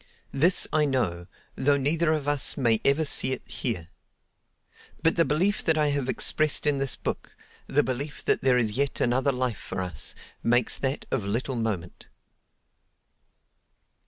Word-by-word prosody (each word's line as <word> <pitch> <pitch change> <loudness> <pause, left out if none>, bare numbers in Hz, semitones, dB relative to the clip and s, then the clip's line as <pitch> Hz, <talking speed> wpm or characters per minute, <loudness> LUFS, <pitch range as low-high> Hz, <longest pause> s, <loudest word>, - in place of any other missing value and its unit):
This 170 +7 +2
I 155 -1 +3
know, 95 -11 -1 0.3
though 140 +1 +2
neither 155 +4 +1
of 150 -3 -1
us 145 -2 +1
may 115 -5 +2
ever 145 +3 +2
see 130 -2 +2
it 130 - -6
here. 90 -10 -3 1.1
But 165 - +3
the 165 - +3
belief 185 +7 +1
that 160 -1 +2
I 150 -1 +2
have 140 -2 -1
expressed 155 -1 +2
in 145 -2 +1
this 135 -2 +1
book—the 145 +2 -4
belief 130 +4 -4
that - - +1
there 130 -2 +3
is 115 -3 +1
yet 140 +5 -1
another 130 +3 +2
life 125 -4 -2
for - - -6
us—makes 95 - -2
that 135 +2 -2
of 120 -7 -1
little 120 +6 -2
moment. 105 -7 -4
135 Hz, 150 wpm, -26 LUFS, 120-145 Hz, 1.1 s, I